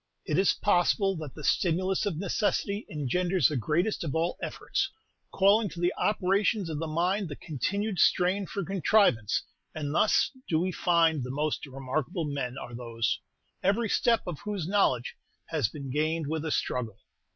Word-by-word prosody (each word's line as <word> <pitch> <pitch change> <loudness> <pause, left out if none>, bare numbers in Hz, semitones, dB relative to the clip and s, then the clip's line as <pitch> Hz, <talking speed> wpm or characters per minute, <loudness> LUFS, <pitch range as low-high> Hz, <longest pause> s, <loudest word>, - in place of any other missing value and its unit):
It 155 +3 +1
is 195 - +4
possible 195 +1 +2
that 155 -4 -7
the 150 - -9
stimulus 185 +6 +1
of 180 -6 -2
necessity 200 +2 -1
engenders 170 +3 +1
the 150 - -3
greatest 170 - 0
of 160 -2 -3
all 165 +2 0
efforts, 390 - -2 0.4
calling 200 +2 +4
to 170 - -9
the 175 +1 +1
operations 200 -2 +1
of 150 - -3
the 165 - -3
mind 180 +4 0
the 145 - -5
continued 185 - -2
strain 185 +4 +3
for 200 -3 -4
contrivance; 190 - +2 0.3
and 145 -2 -3
thus 210 +6 +3 0.2
do 160 - +2
we 185 +2 0
find 165 -4 +2
the 125 - -5
most 150 +2 -2
remarkable 135 +5 -3
men 135 -3 -3
are 120 - -7
those, 115 -2 -2 0.4
every 210 +4 +1
step 230 +2 +2
of 170 -6 -5
whose 205 -6 -4
knowledge 175 - +1 0.4
has 150 -10 +1
been 140 -1 -7
gained 155 +3 0
with 160 +2 -3
a 160 - -2
struggle." 120 -5 -2
165 Hz, 165 wpm, -28 LUFS, 145-195 Hz, 0.4 s, is